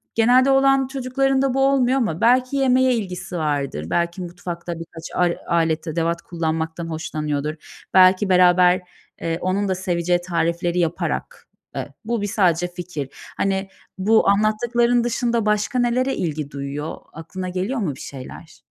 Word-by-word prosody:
genelde 250 +4 +5
oğlan 270 0 +4
çocuklarında 270 0 0
bu 270 - 0
olmuyor 265 -1 +2
ama 195 -11 -1
belki 255 +3 +3
yemeğe 260 -1 +3
ilgisi 190 -4 -5
vardır, 140 - -2
belki 170 - -1
mutfakta 175 0 -6
birkaç 165 -1 -10
ar 175 -1 +2
alet 165 -1 +1
edevat 165 +1 -1
kullanmaktan 165 0 -3
hoşlanıyordur. 155 -1 -4
Belki 185 +1 +5
beraber, 180 0 +5 0.4
eee, 165 0 -1
onun 195 +2 0
da 190 - +1
seveceği 175 -1 0
tarifleri 170 0 -1
yaparak 170 -1 -2 0.3
Eee, - - -5
bu 230 -2 -1
bir 205 - -1
sadece 175 -4 +2
fikir. 175 -6 -6 0.3
Hani, 195 0 0 0.3
bu 210 +2 +3
anlattıkların 235 +4 +2
dışında 235 -1 0
başka 210 +4 +1
nelere 250 +2 +1
ilgi 150 -4 -3
duyuyor? 140 +2 -5 0.2
Aklına 180 +3 -6
geliyor 190 +8 -2
mu 165 - -2
bir - - -14
şeyler? 130 -2 -10
180 Hz, 140 wpm, -22 LUFS, 165-235 Hz, 0.4 s, genelde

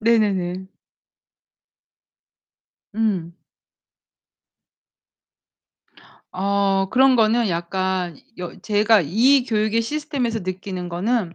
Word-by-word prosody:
네네네. 195 -5 +1 2.3
응. 190 -7 -1 3.0
어 195 0 0
그런 260 0 +4
거는 225 0 +3
약간 180 +1 -2 0.2
여 180 -1 -7
제가 215 0 +3
이 245 - +3
교육의 220 -1 0
시스템에서 250 -4 -3
느끼는 185 0 -5
거는 185 +1 -1
205 Hz, 150 characters per minute, -21 LUFS, 185-230 Hz, 3.0 s, 그런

